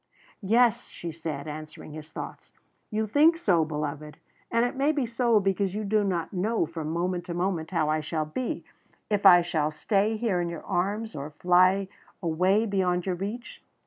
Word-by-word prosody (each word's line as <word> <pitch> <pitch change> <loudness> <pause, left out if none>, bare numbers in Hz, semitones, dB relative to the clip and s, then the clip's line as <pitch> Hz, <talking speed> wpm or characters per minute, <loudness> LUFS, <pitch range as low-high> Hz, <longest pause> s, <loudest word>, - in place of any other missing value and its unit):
"Yes," 235 +3 +3
she 170 - -6
said, 155 -3 -5
answering 155 0 -8
his 155 0 -9
thoughts. - - -8 0.4
"You 220 0 -1
think 300 +10 +4
so, 180 - +3
beloved, 150 -1 -4 0.3
and 230 +1 +2
it 245 - -3
may 280 +3 +2
be 290 -4 0
so 235 -1 +2
because 195 -1 0
you 215 - -2
do 210 +1 +2
not 180 -3 -2
know 200 +1 0
from 160 -1 -5
moment 175 +2 -1
to 170 - -5
moment 175 -3 -1
how 165 -5 0
I 155 +1 +1
shall 155 +1 -2
be 235 +12 -4 0.5
if 205 -1 +4
I 175 -2 +8
shall 160 -3 0
stay 205 +7 0
here 210 -6 0
in 170 - -2
your 170 -2 -7
arms, 210 +5 -1
or 140 +1 -5
fly 185 +4 +3 0.3
far 170 -3 -2
away 190 +7 +3
beyond 185 -4 0
your 185 - 0
reach. 205 +7 -6
185 Hz, 185 wpm, -27 LUFS, 160-215 Hz, 0.5 s, I